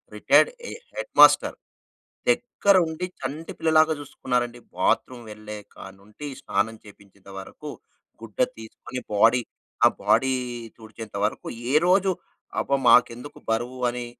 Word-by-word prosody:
Retired 485 Hz, -, +4 dB, 0.2 s
a -, -, -7 dB, 0.2 s
head -, -, -6 dB
master. -, -, +6 dB, 0.7 s
దగ్గరుండి 190 Hz, -8 st, +2 dB, 0.2 s
చంటి 155 Hz, +3 st, -5 dB
పిల్లలాగా 160 Hz, 0 st, +4 dB
జూసుకున్నారండి. 125 Hz, -4 st, -3 dB, 0.2 s
Bathroom 125 Hz, -2 st, 0 dB
వెళ్ళే 105 Hz, 0 st, -8 dB, 0.2 s
కానుండి 100 Hz, +9 st, -11 dB
స్నానం 110 Hz, +2 st, -1 dB
చేపించేంత 100 Hz, -1 st, -17 dB
వరకు 95 Hz, -, -10 dB, 0.5 s
గుడ్డ 115 Hz, -2 st, -12 dB, 0.2 s
తీసుకొని 120 Hz, +3 st, -8 dB
బాడీ 115 Hz, +4 st, +4 dB, 0.4 s
ఆ -, -, +10 dB, 0.2 s
బాడీ 130 Hz, 0 st, +3 dB, 0.4 s
తుడిచేంత 110 Hz, -2 st, -9 dB
వరకు 105 Hz, -, -4 dB, 0.2 s
ఏ -, -, 0 dB
రోజు 190 Hz, +1 st, +4 dB, 0.5 s
అబ్బా! 140 Hz, -, +1 dB
మాకెందుకు 125 Hz, +3 st, +3 dB
బరువు 120 Hz, +3 st, -2 dB
అని 120 Hz, 0 st, -5 dB
120 Hz, 115 wpm, -24 LUFS, 110-155 Hz, 0.7 s, ఆ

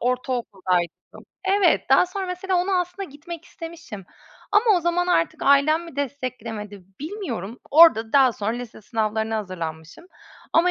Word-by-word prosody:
ortaokuldaydım. 220 Hz, -, -2 dB, 0.2 s
Evet, 390 Hz, -1 st, +3 dB
daha -, -, +6 dB
sonra 380 Hz, +1 st, -4 dB
mesela 365 Hz, +1 st, -2 dB
onu 360 Hz, +2 st, 0 dB
aslında 360 Hz, +2 st, -5 dB
gitmek 325 Hz, +4 st, -9 dB
istemişim 330 Hz, -, -9 dB, 0.5 s
ama 415 Hz, +3 st, +5 dB
o -, -, +1 dB
zaman 345 Hz, +1 st, 0 dB
artık 165 Hz, -, +1 dB
ailem 300 Hz, +4 st, +4 dB
mi 335 Hz, -5 st, -12 dB
desteklemedi, 235 Hz, -8 st, -5 dB, 0.2 s
bilmiyorum. 300 Hz, -, -5 dB
Orada 285 Hz, -9 st, +6 dB
daha 270 Hz, -3 st, +5 dB
sonra 215 Hz, 0 st, -2 dB
lise 240 Hz, -2 st, -7 dB
sınavlarına 220 Hz, 0 st, -1 dB
hazırlanmışım 170 Hz, -, -6 dB, 0.5 s
ama 350 Hz, +2 st, +4 dB
275 Hz, 135 wpm, -23 LUFS, 215-345 Hz, 0.5 s, daha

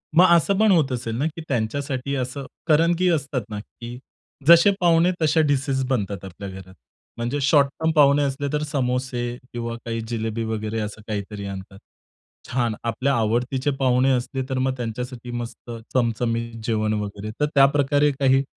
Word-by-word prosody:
मग 180 Hz, +3 st, +8 dB
असं 190 Hz, +4 st, +2 dB
पण 215 Hz, -2 st, +5 dB
होत 155 Hz, -7 st, +3 dB
असेल 115 Hz, -2 st, -3 dB
ना, 140 Hz, -, 0 dB
की 160 Hz, +1 st, -7 dB
त्यांच्यासाठी 135 Hz, +3 st, -2 dB
असं. 130 Hz, +1 st, -4 dB, 0.2 s
कारण 165 Hz, +2 st, +4 dB
की 180 Hz, +1 st, +2 dB
असतात 145 Hz, -5 st, 0 dB
ना, 105 Hz, -1 st, -4 dB
की 120 Hz, +3 st, -10 dB, 0.5 s
जसे 170 Hz, +4 st, +8 dB
पाहुणे 170 Hz, 0 st, +4 dB
तसे 155 Hz, +1 st, +3 dB
डिशेस 140 Hz, -2 st, +1 dB
बनतात 100 Hz, -6 st, -2 dB
आपल्या 95 Hz, +1 st, -8 dB
घरात. 95 Hz, -1 st, -10 dB, 0.4 s
म्हणजे 120 Hz, +5 st, -2 dB
शॉर्टटर्म 145 Hz, +3 st, +3 dB
पाहुणे 145 Hz, -2 st, +5 dB
असले 140 Hz, +1 st, -2 dB
तर 150 Hz, 0 st, 0 dB
समोसे 125 Hz, -3 st, -2 dB, 0.2 s
किंवा 115 Hz, -1 st, -4 dB
काही 115 Hz, 0 st, -3 dB
जिलेबी 115 Hz, -1 st, -2 dB
वगैरे, 110 Hz, 0 st, -3 dB
असं 105 Hz, 0 st, -5 dB
काहीतरी 105 Hz, -1 st, -4 dB
आणतात. 95 Hz, 0 st, -8 dB, 0.7 s
छान 120 Hz, -3 st, 0 dB
आपल्या 125 Hz, +4 st, 0 dB
आवडतीचे 125 Hz, +5 st, 0 dB
पाहुणे 130 Hz, 0 st, +3 dB
असले 130 Hz, +1 st, -1 dB
तर 130 Hz, -, -1 dB
मग 130 Hz, 0 st, +1 dB
त्यांच्यासाठी 120 Hz, +1 st, -5 dB
मस्त 120 Hz, 0 st, -6 dB, 0.2 s
चमचमीत 115 Hz, -1 st, 0 dB
जेवण 110 Hz, -1 st, 0 dB
वगैरे. 105 Hz, +1 st, -6 dB
तर 150 Hz, -, +3 dB
त्याप्रकारे 145 Hz, +1 st, +4 dB
काही 135 Hz, 0 st, +4 dB
125 Hz, 160 wpm, -23 LUFS, 115-145 Hz, 0.7 s, मग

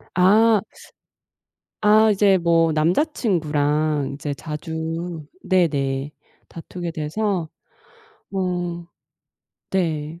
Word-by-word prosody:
아. 210 Hz, +4 st, +5 dB, 1.2 s
아 215 Hz, +1 st, +5 dB
이제 195 Hz, -1 st, +4 dB
뭐 165 Hz, -2 st, +2 dB
남자친구랑 155 Hz, -, 0 dB
이제 145 Hz, 0 st, -4 dB
자주 160 Hz, +2 st, -5 dB, 0.2 s
네네. 145 Hz, -6 st, 0 dB, 0.4 s
다투게 170 Hz, +1 st, -7 dB
돼서. 165 Hz, +3 st, -2 dB, 0.9 s
어 175 Hz, -2 st, -2 dB, 0.8 s
네. 165 Hz, -3 st, -2 dB
170 Hz, 135 characters per minute, -22 LUFS, 155-190 Hz, 1.2 s, 아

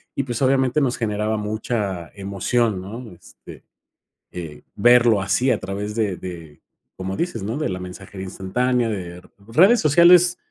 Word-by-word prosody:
y, 140 Hz, -, -1 dB
pues, 120 Hz, -2 st, -4 dB
obviamente 135 Hz, +1 st, +2 dB
nos 125 Hz, -3 st, 0 dB
generaba 110 Hz, -1 st, -1 dB
mucha 105 Hz, -5 st, -3 dB
emoción, 100 Hz, +1 st, -1 dB
¿no? 110 Hz, +4 st, -9 dB
Este, 85 Hz, -, -15 dB, 0.7 s
eh, 80 Hz, -4 st, -8 dB
verlo 120 Hz, -1 st, +5 dB
así 110 Hz, +7 st, +1 dB
a 115 Hz, -, +2 dB
través 100 Hz, +3 st, -5 dB
de 105 Hz, -5 st, -1 dB
de 85 Hz, -5 st, -9 dB, 0.4 s
como 95 Hz, +1 st, -4 dB
dices 175 Hz, -, -3 dB
¿no? 110 Hz, +6 st, -3 dB
De 150 Hz, -, -1 dB
la 95 Hz, -, -4 dB
mensajería 95 Hz, +1 st, -9 dB
instantánea. 120 Hz, +6 st, -1 dB
De 90 Hz, -4 st, -6 dB, 0.3 s
redes 190 Hz, -, +5 dB
sociales 175 Hz, +3 st, +6 dB
105 Hz, 150 wpm, -21 LUFS, 95-125 Hz, 0.7 s, sociales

